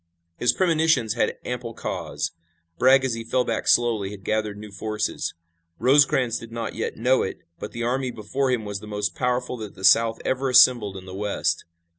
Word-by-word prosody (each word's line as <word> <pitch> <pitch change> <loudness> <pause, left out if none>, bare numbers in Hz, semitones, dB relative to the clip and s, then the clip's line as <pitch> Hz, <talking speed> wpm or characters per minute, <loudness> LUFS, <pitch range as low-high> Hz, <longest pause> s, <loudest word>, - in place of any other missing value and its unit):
His 125 - +3
premonitions 160 - +2
had 120 - 0
ample 120 -2 -5
cause. - - -4 0.5
Bragg 130 +1 +5
as 130 - 0
he 115 0 -4
fell 125 +2 +1
back 115 - -2
slowly 115 -5 +3
had 100 -1 -10
gathered 110 -1 -1
new 105 0 -10
forces. 105 +2 -3 0.4
Rosecrans 130 -3 +3
did 115 0 -11
not 115 0 -4
yet - - -4
know 125 +3 +3
it, 95 - -4 0.2
but 105 - -6
the 120 - -5
army 130 +2 -1
before 125 +4 -2
him 120 -4 0
was 100 -1 -4
the 105 - -11
most 105 -1 -2
powerful 125 0 -1
that 110 -3 -8
the 95 - -12
South 115 +4 +5
ever 130 +1 0
assembled 120 -6 +5
in 95 - -10
the 95 - -9
West. 105 +1 -1
115 Hz, 190 wpm, -24 LUFS, 105-125 Hz, 0.5 s, Bragg